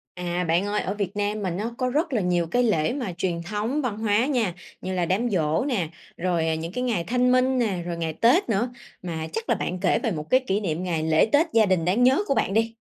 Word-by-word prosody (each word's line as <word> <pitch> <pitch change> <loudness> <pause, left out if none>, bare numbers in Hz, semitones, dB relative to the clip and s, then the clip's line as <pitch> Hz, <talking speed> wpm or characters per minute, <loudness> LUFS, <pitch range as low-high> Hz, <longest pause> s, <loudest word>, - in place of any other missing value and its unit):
À, 180 0 -2
bạn 175 +4 +2
ơi, 205 +1 0
ở 195 - -3
Việt 200 -2 -4
Nam 205 +1 -1
mình 180 -2 -2
á 210 - -2
nó 235 +1 -4
có 255 - 0
rất 305 +5 0
là 230 - +1
nhiều 175 -2 +1
cái 245 +9 +1
lễ 200 -9 +1
mà 245 -8 -3
truyền 175 -1 -2
thống 215 - -2
văn 225 -5 -2
hóa 220 +2 +2
nha, 235 -11 0 0.3
như 185 - -4
là 180 -2 0
đám 215 +8 0
giỗ 160 -1 +1
nè, 225 - -1 0.3
rồi, 170 -2 0
à, 160 - +1
những 165 +2 -5
cái 250 +5 -2
ngày 220 -9 0
Thanh 250 +5 +2
minh 255 +1 +3
nè, 200 -7 0
rồi 175 -1 -4
ngày 165 -1 -2
Tết 240 - +3
nữa. 225 +3 +1 0.3
Mà 160 -3 -4
chắc 225 - -4
là - - +3
bạn 180 - -3
kể - - +2
về 225 - 0
một 155 -2 -6
cái 255 - +5
kỷ 210 -5 -1
niệm 170 -3 -2
ngày 165 -3 -1
lễ 160 +3 +3
Tết 300 +4 +5
gia 225 -2 +5
đình 185 -4 +1
đáng 195 +8 +2
nhớ 260 +2 +5
của 275 - +1
bạn 195 - 0
đi! 225 +1 +1
200 Hz, 270 wpm, -24 LUFS, 175-240 Hz, 0.3 s, cái